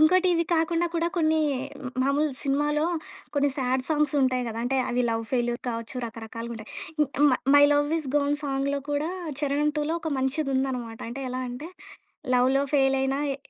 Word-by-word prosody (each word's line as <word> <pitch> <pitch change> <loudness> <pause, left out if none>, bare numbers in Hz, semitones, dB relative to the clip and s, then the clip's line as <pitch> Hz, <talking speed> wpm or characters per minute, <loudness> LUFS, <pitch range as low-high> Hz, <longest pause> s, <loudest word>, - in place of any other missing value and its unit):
ఇంకోటి, 365 +4 +5
ఇది 335 - +2
కాకుండా 330 +1 +2
కూడా 335 0 +1
కొన్ని 315 -1 +3 0.4
హ్మ్, 255 -2 -5
మామూలు 285 +3 +2
సినిమాలో 295 +2 +1 0.5
కొన్ని 285 0 +3
శాడ్ 255 -1 0
సాంగ్సుంటాయి 290 -5 +2
గదా! 225 +1 -4
అంటే, 265 +2 0
అవి 245 +1 +1
లవ్ 225 0 -1
ఫెయిల్యూర్ 240 -1 0
కావచ్చు, 230 +1 -4
రకరకాలుగుంటాయి. 230 0 -7 0.3
ఇ - - +6 0.2
ఇమ్మ 295 - +6 0.2
'మై 285 - +8
లవ్ 290 0 +2
ఇస్ 300 - -5
గాన్' 290 0 +1
సాంగ్‌లో 280 0 -1
కూడా, 290 +2 0 0.3
చరణం 290 +1 +1
2లో 300 +2 0
ఒక 320 - -3
మంచిదుందనమాట. 265 -4 -1
అంటే, 260 +4 -5
ఎలా 255 +1 -3
అంటే, 250 +7 -6 0.7
లవ్‌‌లో 260 +3 +3
ఫెయిలైనా 270 0 +2
ఏ - - -5
275 Hz, 160 wpm, -26 LUFS, 250-300 Hz, 0.7 s, మై